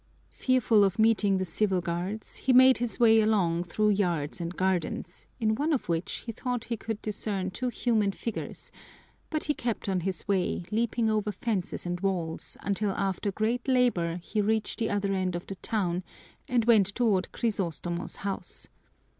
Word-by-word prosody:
Fearful 245 -5 +3
of 195 -1 +1
meeting 220 -3 +3
the 185 - -1
civil 190 +2 +1
guards, 175 +5 -4
he 260 - +2
made 260 0 +7
his 240 0 -2
way 225 -2 +6
along 180 -6 +2
through 210 +4 +2
yards 175 -5 0
and 170 +1 -4
gardens, 180 -1 -2
in 220 -1 +2
one 295 +8 0
of 270 - -1
which 165 +1 -2
he 230 - -3
thought 245 +1 -3
he 235 - -3
could 225 0 -5
discern 200 -3 -2
two 250 +7 -3
human 220 -3 +1
figures, 225 +2 -6 0.6
but 310 -1 -2
he 295 - +1
kept 235 -7 -3
on 190 -2 +1
his 185 +2 -3
way, 190 -3 0
leaping 230 +1 +1
over 215 -1 +1
fences 200 -3 -3
and 175 0 -2
walls, 175 -4 -2
until 205 +1 0
after 195 +1 -1
great 225 +5 -1
labor 240 -11 +2
he 215 - -1
reached 220 +2 0
the 225 - 0
other 200 -1 0
end 185 -2 0
of 175 - -5
the 195 - -6
town 185 -4 -1 0.4
and 240 -3 +2
went 220 -5 +5
toward 215 -7 +1
Crisostomo's 175 -6 -2
house. 195 -1 -4
205 Hz, 170 wpm, -28 LUFS, 185-225 Hz, 0.6 s, made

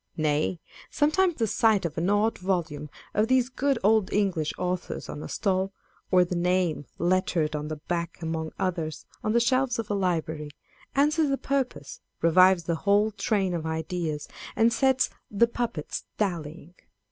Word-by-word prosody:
Nay, 155 +2 0 0.3
sometimes 340 +4 +2
the 230 - +1
sight 220 -3 +2
of 160 -2 -3
an 170 +3 0
odd 210 +2 +2
volume 170 -6 -2 0.2
of 215 +2 +2
these 255 0 +3
good 270 +1 0
old 215 -1 +3
English 185 -7 +1
authors 180 0 -3
on 150 - -6
a - - -7
stall, 195 0 0 0.4
or 180 -1 +5
the 180 - -4
name 175 -4 0
lettered 175 -3 +1
on 150 0 -3
the 155 - -3
back 170 +2 -4
among 160 -1 -3
others 170 -5 -2 0.2
on 215 - 0
the 235 - +5
shelves 255 +1 +2
of 225 -2 -4
a - - +2
library, 160 -6 -1 0.5
answers 300 +2 +3
the 275 - +1
purpose, 270 - -3 0.2
revives 185 +2 +5
the 165 0 -1
whole 205 +4 +3
train 200 -3 0
of 165 -2 -3
ideas, 160 -1 -3 0.3
and 225 +1 +4
sets 265 0 +2
" - - -48
the 210 +3 +4
puppets 235 -9 -4
dallying." 170 -4 -3
185 Hz, 165 wpm, -27 LUFS, 160-225 Hz, 0.5 s, or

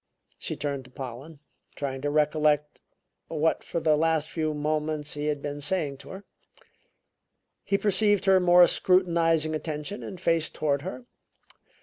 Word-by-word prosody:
She - - -4
turned 140 -2 -3
to - - -15
Pollen, 135 +3 -9 0.3
trying 135 -2 -4
to 145 - -1
recollect 150 0 +1 0.5
what 160 0 0
for 170 - -3
the 155 -1 +3
last 160 0 +1
few 155 -2 -2
moments 150 0 -2
he 150 0 -3
had 145 -2 -2
been 145 0 -4
saying 145 -3 -1
to - - -13
her. 190 +1 -9 1.4
He 200 - +1
perceived 205 0 +3
her 190 -1 +5
more 180 0 +7
scrutinizing 165 -4 +2
attention 155 +5 -4
and 185 - -8
faced 165 -2 0
toward 145 -2 0
her. 190 - -7
155 Hz, 145 wpm, -27 LUFS, 145-175 Hz, 1.4 s, more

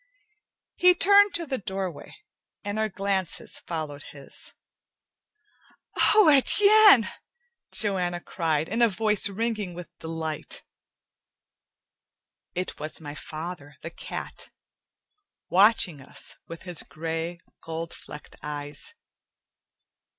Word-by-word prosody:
He 360 0 +6
turned 405 +3 +6
to 335 - 0
the 265 -3 -2
doorway, 190 -4 -5 0.5
and 205 +1 -3
our 220 0 +1
glances 195 -2 -2
followed 155 -4 -5
his. 140 -1 -8 1.6
"Oh, 425 -5 +7
Etienne!" 400 - +7 0.6
Joanna 180 -4 +1
cried, 160 -3 -1
in 225 +5 -1
a 235 - +6
voice 210 0 +1
ringing 210 -3 -2
with 175 0 -10
delight. 160 -2 -5 1.9
It 180 +1 -4
was 155 +1 -5
my 145 -2 -7
father, 155 -1 -7
the 165 - -5
cat, - - -8 1.0
watching 190 -6 +4
us 135 - -5
with 165 0 -9
his 180 -4 -3
gray, 165 +3 -4 0.2
gold 165 +1 -5
flecked 150 - -11
eyes. 145 -1 -6
180 Hz, 100 wpm, -26 LUFS, 160-220 Hz, 1.9 s, Oh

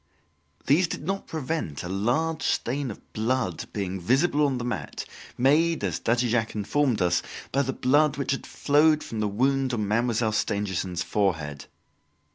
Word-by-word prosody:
These 165 +6 +4
did 160 - -5
not 195 +2 -2
prevent 155 - -3
a - - -4
large 125 - 0
stain 135 +2 -1
of 105 - -11
blood 110 -5 -1
being 95 -2 -3
visible 145 - +3
on 135 -2 -1
the 120 - -4
mat, 105 -12 -4 0.3
made, 155 +3 +3
as 90 -4 -1
Daddy 120 +2 +1
Jacques 110 -1 0
informed 115 +1 +1
us, 85 -1 +2 0.3
by 140 - +2
the 135 -1 -1
blood 145 +3 +2
which 140 - -1
had 135 - -3
flowed 150 +1 +3
from 110 - -5
the 105 - +1
wound 130 +4 +1
on 105 -3 -1
Mademoiselle 115 +1 +1
Stangerson's 95 -4 -1
forehead. 80 -9 -1
120 Hz, 160 wpm, -26 LUFS, 100-145 Hz, 0.3 s, These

